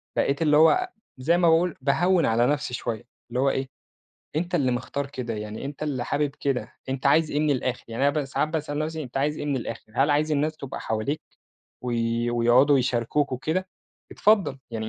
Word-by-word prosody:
بقيت 140 +2 +1
اللي 150 -2 +4
هو 265 - +5 0.3
زي 160 +7 +2
ما 175 -1 +4
باقول- 165 +1 +3
باهوِّن 175 +5 +3
على 115 +2 +3
نفْسي 145 -2 -1
شوية، 120 -2 -3 0.3
اللي 125 +1 -2
هو 135 +1 +3
إيه، 135 0 -1 0.7
أنت 175 +3 -1
اللي 135 -7 +2
مختار 125 +3 -3
كده، 125 -4 -5
يعني 105 +2 -6
أنت 140 +2 -6
اللي 135 -5 -2
حابب 145 +2 0
كده، 135 -3 -1 0.2
أنت 135 0 -2
عايز 155 +3 +4
إيه 145 - 0
من 155 -1 +2
الآخِر 130 -2 -1
يعني 120 +5 +1
أنا - - +3
ب - - -3
ساعات 140 +3 -1
باسأل 155 -2 -3
نفْسي 155 +1 -2
أنت 125 -2 -9
عايز 145 +3 0
إيه - - -4
من 140 -2 0
الآخِر، 115 -3 -6
هل 140 +3 +3
عايز 150 +1 +2
الناس 150 +2 0
تبقى 135 -3 -7
حواليك 110 +7 -2 0.6
وي 120 -1 0
ويقعدوا 120 +4 +4
يشاركوك 125 +3 0
وكده، 160 +9 -2 0.4
اتفضّل، 200 -10 +3
يعني 110 -1 -4
140 Hz, 195 wpm, -25 LUFS, 125-155 Hz, 0.7 s, هو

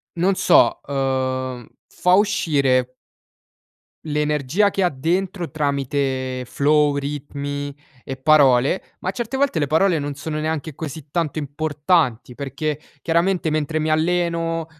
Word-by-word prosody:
non 185 +3 +2
so, 120 -9 +5
uhm, 130 -2 -2 0.2
fa 180 - +1
uscire 140 -11 +2 1.1
l'energia 150 +5 +1
che 195 - -1
ha 180 - +4
dentro 175 +5 -2
tramite 135 -3 -1
flow, 145 +3 +2
ritmi 145 0 -4 0.3
e 135 - -6
parole, 135 +1 +4 0.2
ma 185 - -3
certe 240 +5 -4
volte 270 - +1
le 145 - 0
parole 165 +2 +3
non 145 0 -4
sono 155 +2 -4
neanche 155 -1 -3
così 150 -1 -7
tanto 165 -3 -1
importanti 145 -3 0
perché, 145 +3 -3 0.2
chiaramente, 170 +1 +1
mentre 155 0 -1
mi 155 0 -1
alleno 165 0 0
150 Hz, 120 wpm, -21 LUFS, 140-165 Hz, 1.1 s, so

